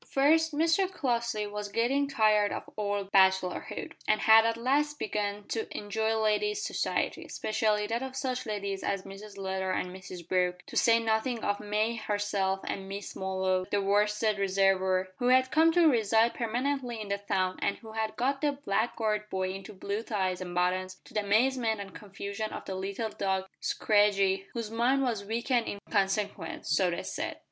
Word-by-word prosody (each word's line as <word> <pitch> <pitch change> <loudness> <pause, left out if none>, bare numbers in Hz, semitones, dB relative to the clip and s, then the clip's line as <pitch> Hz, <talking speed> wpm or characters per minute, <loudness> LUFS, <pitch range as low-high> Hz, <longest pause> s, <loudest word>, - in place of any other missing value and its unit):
First, 320 +4 +3
Mr 330 +5 +2
Crossley 235 - -1
was 205 0 -5
getting 245 +7 +1
tired 215 -6 +3
of - - -5
old 205 -2 -2
bachelorhood, 190 -1 +2 0.2
and 215 0 +2
had 220 +1 +7
at 230 0 -1
last 290 +5 +1
begun 205 -2 -2
to 225 - -2
enjoy 220 +2 -1
ladies' 410 - +1
society, - - -1
especially 215 -1 0
that 230 +3 -2
of 265 0 -5
such 255 -2 -2
ladies 200 -2 -3
as 195 -1 -2
Mrs 200 +1 -10
Leather 190 -1 -2
and 185 0 -1
Mrs 185 -2 -9
Brooke, 180 -1 0
to - - -11
say 230 -1 +5
nothing 225 +1 0
of 205 0 0
May 215 +2 -1
herself 205 -3 -1
and 195 -1 -5
Miss 200 +1 -6
Molloy 190 -1 0
the 205 - +1
worsted 210 +1 +1
reservoir 190 -1 +2
who 245 - 0
had 260 +1 +4
come 320 +1 +5
to 345 -1 +5
reside 225 -3 +3
permanently 245 +1 -2
in 210 -2 -6
the 200 0 -1
town 185 -2 -1
and - - 0
who 220 -2 -12
had 220 0 -2
got 270 +3 0
the 295 -1 +2
"Blackguard 215 -4 -1
Boy" 185 0 -1
into 195 +3 -8
blue 200 +2 -3
tights 190 -5 -2
and 175 -1 -6
buttons, 185 +1 0
to - - -17
the 215 - +1
amazement 220 +2 +2
and 195 -1 -7
confusion 200 +1 -5
of - - -7
the 190 - -4
little 195 +4 -3
dog 190 -2 -1
Scraggy, 200 -2 +2
whose 230 -3 -4
mind 250 +4 +2
was 230 -6 -1
weakened 230 +3 0
in - - -3
consequence 195 -5 -1
so 185 +2 +3
they 170 - -3
said. - - -4
210 Hz, 175 wpm, -29 LUFS, 195-235 Hz, 0.2 s, had